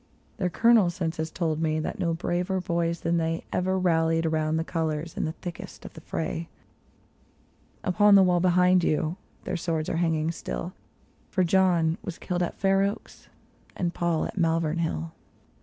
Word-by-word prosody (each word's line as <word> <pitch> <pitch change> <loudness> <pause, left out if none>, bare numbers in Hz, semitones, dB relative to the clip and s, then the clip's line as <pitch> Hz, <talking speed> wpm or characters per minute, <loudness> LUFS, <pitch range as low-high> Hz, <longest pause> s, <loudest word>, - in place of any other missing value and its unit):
Their 185 - 0
colonel 225 -1 +4
since 170 -2 -3
has 160 0 -2
told 160 -1 -2
me 155 -1 +1
that 155 - -4
no 170 -2 0
braver 180 +3 -1
boys 170 -2 -1
than 170 +1 +1
they 165 0 -1
Ever 185 +1 +1
rallied 165 -2 +2
round 155 0 0
the 160 - 0
colors, 160 -1 -3
in - - -1
the 160 - -2
thickest 175 +1 -9
of - - -9
the 160 - -11
fray; 165 +1 -4 1.3
Upon 205 +2 +5
the 195 - +8
wall 180 -1 +3
behind 180 0 +4
you 155 +3 0 0.3
their - - -3
swords 160 -2 -2
are - - -1
hanging 165 -1 +1
still - - -5 0.3
— - - -35
For 185 - +1
John 175 -2 +3
was 185 -6 -6
killed 180 -1 -3
at 175 - -2
Fair 195 0 +3
Oaks, 200 +1 -4 0.5
and 175 -1 -1
Paul 170 -2 0
at - - -5
Malvern 165 -1 +1
Hill. 80 - -2
170 Hz, 175 wpm, -26 LUFS, 160-180 Hz, 1.3 s, the